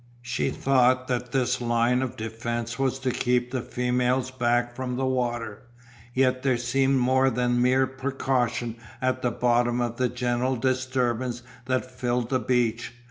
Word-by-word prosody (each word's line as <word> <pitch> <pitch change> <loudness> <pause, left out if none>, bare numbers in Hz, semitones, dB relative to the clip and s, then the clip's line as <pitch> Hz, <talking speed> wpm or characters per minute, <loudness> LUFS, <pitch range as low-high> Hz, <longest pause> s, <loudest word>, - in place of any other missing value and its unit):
She 120 - -1
thought 130 -1 +2
that 125 -1 -2
this 130 -1 0
line 120 +1 +2
of 130 -1 -4
defence 115 +1 -4
was 135 -1 +1
to 130 -1 -1
keep 125 0 0
the 130 -2 -1
females 125 +1 0
back 120 -1 0
from 125 -1 -3
the 130 +1 -1
water, 120 -4 -2 0.5
yet 130 -1 +2
there 130 -2 +2
seemed 135 +3 +1
more 130 +1 +3
than 120 0 +1
mere 130 +1 +4
precaution 130 -3 -1 0.2
at 130 0 0
the 125 - +1
bottom 120 0 +1
of 120 -1 -2
the 125 -1 +1
general 125 +1 0
disturbance 130 -1 -1 0.2
that 130 0 0
filled 125 -1 -2
the 130 - +2
beach. 120 -1 0
125 Hz, 155 wpm, -26 LUFS, 120-130 Hz, 0.5 s, mere